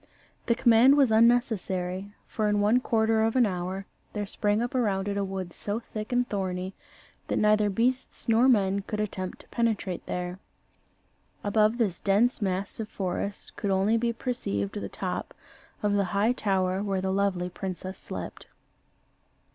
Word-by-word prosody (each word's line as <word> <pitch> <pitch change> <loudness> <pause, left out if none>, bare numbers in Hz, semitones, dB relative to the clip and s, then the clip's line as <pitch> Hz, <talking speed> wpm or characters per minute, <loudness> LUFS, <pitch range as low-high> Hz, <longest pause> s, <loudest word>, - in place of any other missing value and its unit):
The 235 - +3
command 245 +3 +6
was 270 -5 +4
unnecessary; 205 -5 +2
for 215 -1 -1
in 210 0 +2
one 210 +4 +4
quarter 225 -2 +2
of 225 +2 +1
an 250 -2 +5
hour 185 0 -3 0.3
there 210 -1 -2
sprung 205 +1 0
up 240 - -3
around 205 -6 0
it 200 - -1
a 200 - 0
wood 190 -3 -4
so 205 +2 -2
thick 215 -1 -7
and 245 0 +2
thorny 185 -2 -3 0.5
that - - -1
neither 210 0 +4
beasts 245 +6 -1
nor 235 +3 +5
men 200 -5 +3
could 210 +2 -5
attempt 185 -3 -4
to - - -20
penetrate 220 -6 -1
there. 180 +1 -4 1.0
Above 215 +2 +3
this 205 -8 0
dense 220 +5 +2
mass 190 +1 -2
of 220 -1 -4
forest 195 +1 -4
could 205 - -2
only 195 +3 +3
be 235 +1 +1
perceived 100 - -3
the - - -4
top - - -4 0.5
of 205 -1 +2
the 200 -1 +2
high 200 +5 +2
tower 190 -5 0
where 195 -2 -1
the 190 0 -1
lovely 190 -2 0
princess 185 0 -6
slept. - - -7
205 Hz, 165 wpm, -27 LUFS, 190-225 Hz, 1.0 s, command